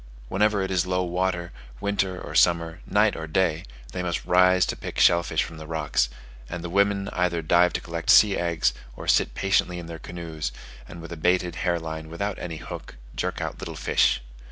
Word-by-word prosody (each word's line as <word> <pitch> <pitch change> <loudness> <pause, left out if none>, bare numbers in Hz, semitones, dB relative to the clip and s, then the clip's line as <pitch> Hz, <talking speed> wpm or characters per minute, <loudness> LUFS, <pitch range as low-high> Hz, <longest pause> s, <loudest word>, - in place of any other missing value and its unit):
Whenever 105 0 +2
it 95 - -3
is 90 -1 +1
low 90 0 +1
water, 90 -1 -1 0.3
winter 95 -2 -1
or - - -8
summer, 85 -1 +3
night 105 0 +3
or 80 -1 -5
day, 80 -1 +1 0.3
they 90 - -3
must 85 -2 -2
rise 90 0 +5
to - - -3
pick - - -7
shell 85 -1 +6
fish - - 0
from 80 - -9
the 80 0 -9
rocks; 75 -6 0 0.4
and 85 -1 -5
the 85 - -5
women 100 0 +2
either 85 -2 0
dive 85 +3 +4
to - - -3
collect 85 0 -5
sea 105 -2 +7
eggs, 85 -8 +1 0.2
or - - -9
sit - - +3
patiently 95 -2 +1
in 85 - -6
their 80 -1 -8
canoes, 80 -5 -5 0.4
and 85 - -9
with 85 - -9
a 85 - -6
baited 90 +1 +1
hair 90 -1 +1
line 80 -1 -6
without 100 +5 -3
any 85 -3 -5
hook, - - -8 0.2
jerk - - -2
out - - -4
little - - -6
fish. - - +2
85 Hz, 200 wpm, -25 LUFS, 85-95 Hz, 0.4 s, sea